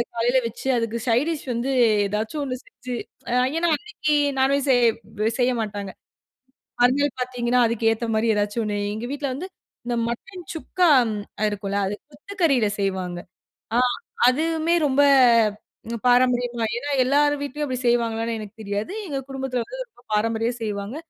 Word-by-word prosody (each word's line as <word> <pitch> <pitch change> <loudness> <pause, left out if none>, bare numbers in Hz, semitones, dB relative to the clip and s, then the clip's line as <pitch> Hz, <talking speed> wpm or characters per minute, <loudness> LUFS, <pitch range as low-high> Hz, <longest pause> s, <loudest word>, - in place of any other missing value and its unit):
காலையில 240 +3 +3
வச்சு, 235 +4 -7
அதுக்கு 230 0 -1
சைட் 240 +6 +3
டிஷ் 305 - -5
வந்து 240 +3 -1 0.4
ஏதாச்சும் 220 +8 -3
ஒண்ணு 255 -2 -3
செஞ்சு. 255 -11 -7 0.6
ஏனா, 340 +1 +2
அன்னைக்கு 305 -7 -2 0.2
நான்வெஜ் 275 +1 +2
செய்ய 225 -3 +1
செய்ய 250 0 +3
மாட்டாங்க. 205 -2 -4 0.9
மறுநாள் 265 +2 +3
பாத்தீங்கன்னா 250 -1 +1
அதுக்கு 225 0 +1
ஏத்த 230 +1 -4
மாரி 225 +1 +1
எதாச்சும் 205 +2 0
ஒண்ணு, 205 -1 -2
எங்க 220 +3 -5
வீட்ல 285 0 -3
வந்து 365 +7 -6 0.4
இந்த 240 - -1
மட்டன் 360 +10 -6
சுக்கா 350 +2 +1 0.2
ம் 215 - -2 0.3
அ - - +2
இருக்கும்ல 200 0 -3
அது 200 - -2 0.2
கொத்துக்கறில 290 - +1
செய்வாங்க. 185 -3 -2 0.6
ஆ - - +4 0.5
அதுவுமே 320 +5 +1
ரொம்ப 275 +1 +3 1.1
பாரம்பரியமா, 245 -1 +3
ஏனா 285 +4 -4
எல்லார் 290 +3 +3
வீட்லயும் 290 +1 -3
அப்டி 255 - -2
செய்வாங்களான்னு 230 -1 +1
எனக்கு 210 -2 -9
தெரியாது. 205 - -3
எங்க 280 -4 -2
குடும்பத்தில 265 -2 -2
வந்து - - -9
ரொம்ப 245 - -24
பாரம்பரியமா 225 +2 +1
செய்வாங்க. 205 +2 -4
245 Hz, 145 wpm, -23 LUFS, 225-285 Hz, 1.1 s, ஆ